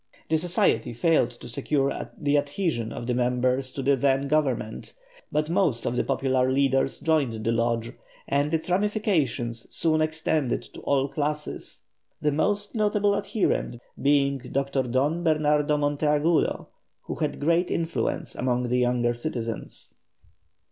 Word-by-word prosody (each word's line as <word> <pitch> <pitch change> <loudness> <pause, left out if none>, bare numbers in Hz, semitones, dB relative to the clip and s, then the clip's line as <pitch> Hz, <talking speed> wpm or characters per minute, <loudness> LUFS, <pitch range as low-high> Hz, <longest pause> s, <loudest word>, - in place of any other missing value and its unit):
The 160 0 +2
Society 140 -9 +1
failed 125 0 +2
to 120 0 -12
secure 140 +3 -1
the 145 -1 +1
adhesion 145 - -1
of 120 - -6
the 125 - 0
members 125 +2 0
of 135 - -3
the 140 0 +5
then 135 +1 +1
Government, 135 -7 -1 0.4
but 150 0 0
most 165 -9 +1
of 120 - -1
the - - +1
popular 130 -1 +1
leaders 135 0 +1
joined 140 -9 0
the 115 - +2
Lodge, 115 0 0 0.3
and 145 +2 +1
its 160 -1 -1
ramifications 175 - 0
soon 155 -1 +1
extended 155 -4 0
to - - -12
all 140 -1 +1
classes, 150 +1 -4 0.4
the 150 - +1
most 205 +7 0
notable 210 -2 +2
adherent 200 - -1 0.2
being 140 -1 +3
Dr. 135 +2 -1
Don 135 +7 0
Bernardo 150 -2 +2
Monteagudo, 150 +2 +1 0.3
who - - -5
had - - -2
great 170 +4 +2
influence 165 0 -2
among 125 -1 -1
the 125 +1 +2
younger 120 -1 +2
citizens. 120 -3 -5
140 Hz, 140 wpm, -26 LUFS, 125-155 Hz, 0.4 s, the